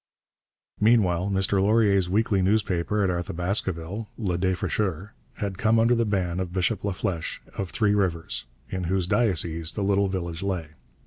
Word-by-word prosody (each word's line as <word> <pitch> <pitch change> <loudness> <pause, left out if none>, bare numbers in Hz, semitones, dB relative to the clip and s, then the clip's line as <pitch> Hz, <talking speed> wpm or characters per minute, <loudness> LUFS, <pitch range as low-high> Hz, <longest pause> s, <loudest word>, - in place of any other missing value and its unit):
Meanwhile 100 -5 +3
Mr 95 0 +1
Laurier's 100 -3 +3
weekly 100 0 +2
newspaper 100 0 +1
at 95 - +2
Arthabaskaville, 90 +3 -2
Le 95 -6 -1
Défricheur, 95 +1 -1 0.2
had 100 -3 -4
come 110 +1 +3
under 115 +2 +4
the 115 -1 +2
ban 95 -4 -1
of 90 -2 -3
Bishop 95 +2 0
Laflèche 95 -4 -2 0.2
of 95 -2 -3
Three 105 +1 +1
Rivers, 85 -11 -1 0.3
in 95 -1 -2
whose 95 +1 0
diocese 85 -7 +1
the 105 - -2
little 100 0 +2
village 85 -3 -4
lay. 90 -5 -2
95 Hz, 145 wpm, -25 LUFS, 90-105 Hz, 0.3 s, under